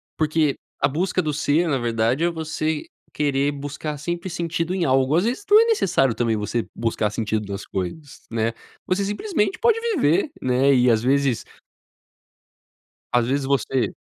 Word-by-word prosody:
porque, 155 Hz, -2 st, +1 dB, 0.3 s
a -, -, +3 dB
busca 180 Hz, +6 st, 0 dB
do 150 Hz, -1 st, -1 dB
ser 155 Hz, +3 st, +1 dB
na 140 Hz, -, +1 dB
verdade 120 Hz, +4 st, 0 dB
é, 175 Hz, -, +3 dB
você 160 Hz, -1 st, -3 dB, 0.3 s
querer 140 Hz, -1 st, +1 dB
buscar 145 Hz, +1 st, -5 dB
sempre 175 Hz, +5 st, -4 dB
sentido 170 Hz, +1 st, -2 dB
em 180 Hz, -3 st, 0 dB
algo, 130 Hz, +2 st, +3 dB
às 175 Hz, -, +3 dB
vezes, 240 Hz, -, -1 dB
não 420 Hz, -, +8 dB
é 455 Hz, -, +5 dB
necessário 185 Hz, -, +2 dB
também, 115 Hz, -2 st, 0 dB
você 105 Hz, +2 st, -2 dB
buscar 115 Hz, -2 st, 0 dB
sentido 105 Hz, -1 st, -2 dB
nas 100 Hz, +1 st, -5 dB
coisas, 100 Hz, -, -5 dB
né, 115 Hz, 0 st, 0 dB, 0.3 s
você 185 Hz, +2 st, 0 dB
simplesmente 285 Hz, -, -1 dB
pode 460 Hz, -1 st, +3 dB, 0.2 s
viver, 170 Hz, -, +2 dB
né, 130 Hz, +2 st, +2 dB
e 125 Hz, -1 st, +4 dB
às 110 Hz, -, +2 dB
vezes 135 Hz, -2 st, +1 dB, 1.7 s
às 120 Hz, -1 st, +2 dB
vezes 140 Hz, +1 st, 0 dB
você 135 Hz, -1 st, 0 dB
145 Hz, 160 wpm, -23 LUFS, 120-170 Hz, 1.7 s, não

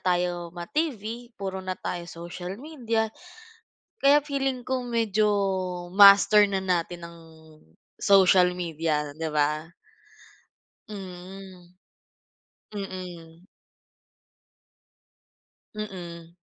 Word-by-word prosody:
tayo 175 Hz, -1 st, -1 dB
ma-TV, 235 Hz, -, -4 dB
puro 190 Hz, -1 st, -4 dB
na 185 Hz, 0 st, -4 dB
tayo 175 Hz, -1 st, -4 dB
social 175 Hz, +2 st, -7 dB
media, 230 Hz, -8 st, -1 dB, 0.9 s
kaya 285 Hz, +2 st, +6 dB
feeling 270 Hz, -3 st, -2 dB
ko 260 Hz, -1 st, -1 dB
medyo, 220 Hz, -3 st, +1 dB, 0.7 s
master 200 Hz, +1 st, +8 dB
na 195 Hz, -1 st, 0 dB
natin 175 Hz, -1 st, -1 dB
ang, 170 Hz, 0 st, -14 dB, 0.8 s
social 190 Hz, -2 st, +6 dB
media, 160 Hz, -4 st, -2 dB
'di 160 Hz, 0 st, -3 dB
ba? 150 Hz, 0 st, +1 dB, 1.3 s
Mm. 185 Hz, -2 st, -10 dB, 1.0 s
Mm. 180 Hz, -4 st, -8 dB, 2.3 s
Mm. 175 Hz, -5 st, -7 dB
185 Hz, 80 wpm, -26 LUFS, 175-215 Hz, 2.3 s, master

